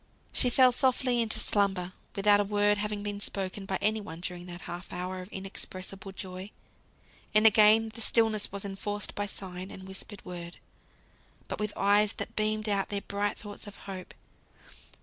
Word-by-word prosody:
She 250 Hz, -, +6 dB
fell 255 Hz, +1 st, +6 dB
softly 250 Hz, -1 st, +2 dB
into 225 Hz, -2 st, 0 dB
slumber, 195 Hz, -3 st, +1 dB, 0.2 s
without 205 Hz, +1 st, +5 dB
a -, -, +4 dB
word 205 Hz, 0 st, +3 dB
having 210 Hz, 0 st, -2 dB
been 205 Hz, -1 st, -3 dB
spoken 195 Hz, -1 st, -3 dB
by 190 Hz, -, 0 dB
any 215 Hz, +1 st, +2 dB
one 165 Hz, -5 st, -8 dB
during 180 Hz, 0 st, -5 dB
that 175 Hz, 0 st, -8 dB
half 175 Hz, +1 st, -7 dB
hour 185 Hz, +1 st, -4 dB
of 180 Hz, -, -9 dB
inexpressible 190 Hz, 0 st, -4 dB
joy. 190 Hz, 0 st, -6 dB, 0.9 s
And 215 Hz, +1 st, +6 dB
again 220 Hz, +1 st, +7 dB
the 230 Hz, -, -6 dB
stillness 220 Hz, -2 st, +3 dB
was 200 Hz, 0 st, -5 dB
enforced 205 Hz, +1 st, -3 dB
by 205 Hz, 0 st, -2 dB
sign 185 Hz, -1 st, -7 dB
and 190 Hz, 0 st, -9 dB
whispered 190 Hz, +1 st, -7 dB
word, 175 Hz, -1 st, -7 dB, 0.9 s
but -, -, -4 dB
with 210 Hz, -1 st, -1 dB
eyes 205 Hz, +1 st, +4 dB
that -, -, -6 dB
beamed 215 Hz, 0 st, 0 dB
out 200 Hz, -2 st, +1 dB
their 200 Hz, -1 st, -2 dB
bright 205 Hz, +1 st, -1 dB
thoughts 205 Hz, 0 st, -8 dB
of 205 Hz, -, -9 dB
hope. 190 Hz, -2 st, -7 dB
200 Hz, 170 wpm, -30 LUFS, 190-210 Hz, 0.9 s, again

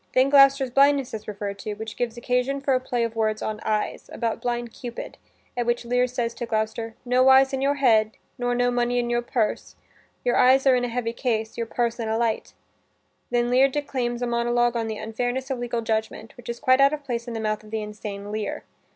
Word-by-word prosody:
Then 260 Hz, +2 st, +4 dB
Gloucester's 275 Hz, -2 st, +6 dB
blindness 275 Hz, 0 st, +3 dB
is 215 Hz, -1 st, -6 dB
referred 200 Hz, -1 st, -5 dB
to, 210 Hz, +1 st, -5 dB
which 220 Hz, +1 st, -7 dB
gives 240 Hz, -1 st, -3 dB
occasion 250 Hz, +3 st, 0 dB
for 275 Hz, 0 st, +1 dB
a 255 Hz, -, +3 dB
play 245 Hz, -2 st, -1 dB
of 230 Hz, 0 st, -3 dB
words 215 Hz, -1 st, 0 dB
on 215 Hz, -1 st, -3 dB
eyes, 215 Hz, -1 st, -2 dB
about 230 Hz, -1 st, -2 dB
blind 240 Hz, -1 st, -3 dB
Cupid, 240 Hz, -2 st, -8 dB, 0.4 s
at 240 Hz, -1 st, -2 dB
which 240 Hz, 0 st, 0 dB
Lear 245 Hz, +1 st, +2 dB
says 240 Hz, -2 st, -2 dB
to 240 Hz, 0 st, -5 dB
Gloucester, 220 Hz, 0 st, -2 dB
"No 255 Hz, +1 st, +4 dB
eyes 265 Hz, +1 st, +6 dB
in 265 Hz, -, -1 dB
your 280 Hz, +1 st, +2 dB
head, 220 Hz, -5 st, +3 dB, 0.2 s
nor 245 Hz, 0 st, 0 dB
no 245 Hz, 0 st, +2 dB
money 245 Hz, 0 st, 0 dB
in 240 Hz, 0 st, 0 dB
your 240 Hz, 0 st, +1 dB
purse? 235 Hz, -3 st, -2 dB, 0.5 s
Your -, -, +2 dB
eyes 265 Hz, +2 st, +5 dB
are 265 Hz, -, +6 dB
in 245 Hz, -, 0 dB
a -, -, -1 dB
heavy 235 Hz, -1 st, -2 dB
case, 225 Hz, -3 st, -2 dB
your 230 Hz, -, -3 dB
purse 235 Hz, 0 st, -1 dB
in 225 Hz, -1 st, -2 dB
a 220 Hz, -, 0 dB
light." 230 Hz, -2 st, -1 dB, 0.7 s
Then 240 Hz, 0 st, +1 dB
Lear 260 Hz, +2 st, +6 dB
declaims 255 Hz, -4 st, -2 dB
a -, -, +1 dB
monolog 240 Hz, 0 st, +1 dB
on 230 Hz, -1 st, -1 dB
the 220 Hz, -1 st, -4 dB
unfairness 245 Hz, +5 st, -3 dB
of 260 Hz, -, -2 dB
legal 240 Hz, -1 st, -2 dB
judgment, 220 Hz, 0 st, -3 dB
which 245 Hz, -, -12 dB
is 235 Hz, 0 st, -4 dB
quite 260 Hz, +1 st, +4 dB
out 275 Hz, +2 st, +5 dB
of 300 Hz, -1 st, -4 dB
place 240 Hz, -3 st, -4 dB
in 235 Hz, -, -5 dB
the -, -, -3 dB
mouth 215 Hz, -1 st, -2 dB
of 215 Hz, -, -14 dB
the 220 Hz, 0 st, -3 dB
insane 210 Hz, -1 st, -7 dB
Lear. 215 Hz, 0 st, -3 dB
240 Hz, 230 wpm, -24 LUFS, 225-255 Hz, 0.7 s, Gloucester's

